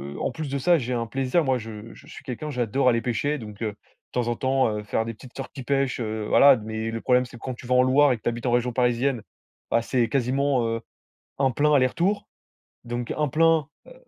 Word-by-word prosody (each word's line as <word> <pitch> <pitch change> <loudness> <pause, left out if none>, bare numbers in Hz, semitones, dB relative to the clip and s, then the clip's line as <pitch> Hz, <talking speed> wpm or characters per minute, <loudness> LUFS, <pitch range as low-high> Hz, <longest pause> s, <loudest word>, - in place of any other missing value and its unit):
heu, - - -6
en - - -1
plus 155 -3 -5
de 140 - -2
ça, 170 +6 +4
j'ai 125 -4 -4
un 115 -1 -2
plaisir, 135 +7 0
moi, 130 -1 +2
je 110 -1 -9
je - - -16
suis - - -11
quelqu'un, 140 +4 -5
j'adore 125 +1 +1
aller 115 -1 +2
pêcher. 130 +6 -1
Donc 105 -4 -10
heu, 110 - 0
de - - -17 0.4
temps 120 -1 -1
en 120 - 0
temps, 130 +2 +1
heu, 105 - -5
faire 110 +2 -1
des 115 - -4
petites 125 +3 -15
sorties 135 0 -7
pêche, 135 0 0
heu, 110 -1 -3
voilà. 140 -1 +7
Mais 110 +1 -4
le 115 - -3
problème, 125 0 +3
c'est 120 - -12
que - - -19
quand 130 - -3
tu 120 - -12
vas 125 - +2
en 125 - +6
Loire 135 +2 +4
et 125 - 0
que 110 - -25
tu - - +1
habites 120 +1 -5
en - - +2
région 120 0 +1
parisienne, 125 +1 +1 0.5
bah, 115 - +3
c'est 120 0 0
quasiment, 135 -1 +1
heu, 115 0 -2 0.6
1 135 -1 +3
plein 150 +4 +2
aller-retour. 170 +10 +1 0.6
Donc 120 0 -4
1 150 -1 +1
plein, 160 0 +3 0.2
heu - - -12
125 Hz, 245 wpm, -25 LUFS, 115-140 Hz, 0.6 s, voilà